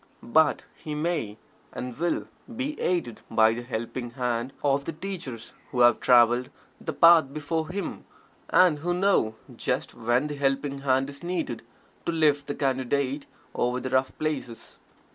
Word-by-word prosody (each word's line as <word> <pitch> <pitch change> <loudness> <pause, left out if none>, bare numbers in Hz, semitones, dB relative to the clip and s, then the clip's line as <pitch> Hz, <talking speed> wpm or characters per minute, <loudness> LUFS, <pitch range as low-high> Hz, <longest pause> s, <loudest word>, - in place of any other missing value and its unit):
But 160 0 +4
he 150 -1 -7
may, 150 -10 -2 0.3
and 125 -1 -6
will, 170 +2 -1 0.3
be 270 +5 -2
aided 170 -10 -1
by 110 0 +4
the 120 - -4
helping 120 0 -4
hand 120 0 -2
of 140 -1 +2
the - - -2
teachers 155 - -6 0.2
who 125 - 0
have 120 -1 +6
traveled 120 +1 +4 0.3
The - - -2
Path 165 -5 +6
before 160 +2 -2
him, 195 +2 -5 0.4
and 175 -5 +5
who 175 +3 -1
know 180 - +2 0.2
just - - -2
when 120 +4 +1
that 145 -1 -5
helping 140 0 0
hand 135 -1 +1
is 140 - -13
needed 170 -9 -3 0.5
to - - +2
lift 150 -3 +2
the 145 - -3
Candidate 135 +1 -1 0.3
over 125 +1 0
the 130 0 -5
rough 130 0 +2
places. 145 -7 -4
140 Hz, 155 wpm, -26 LUFS, 120-160 Hz, 0.5 s, have